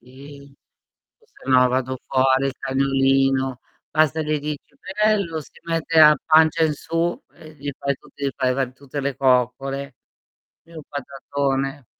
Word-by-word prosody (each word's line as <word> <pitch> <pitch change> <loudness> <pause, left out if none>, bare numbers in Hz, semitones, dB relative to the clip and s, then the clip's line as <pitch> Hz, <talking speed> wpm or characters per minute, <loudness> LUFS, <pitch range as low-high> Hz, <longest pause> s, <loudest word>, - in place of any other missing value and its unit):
sì. 140 +2 -14 0.7
O - - -27
sennò 130 -1 +3
vado 130 0 -1
fuori, 135 0 +2
il 135 - -3
cagnolino, 135 -1 +1 0.3
basta 155 0 +2
le 155 0 -1
dici: 150 0 -4 0.4
"Bello" 200 -7 +1
si - - -14
mette 165 -1 0
a 150 -1 +8
pancia 160 +1 +4
in 155 - +1
su 165 +3 -2
e 155 0 -15
gli 145 -1 -5
fai 140 0 -1
tutti 140 - -10
gli 135 - +1
fai 130 -2 +1
va 135 0 0
tutte 140 +2 -7
le 140 -1 -2
coccole. 135 +1 0 0.7
Lui 165 - -18
è - - -10
un - - -9
patatone. 140 -1 -3
140 Hz, 155 wpm, -22 LUFS, 135-155 Hz, 0.7 s, a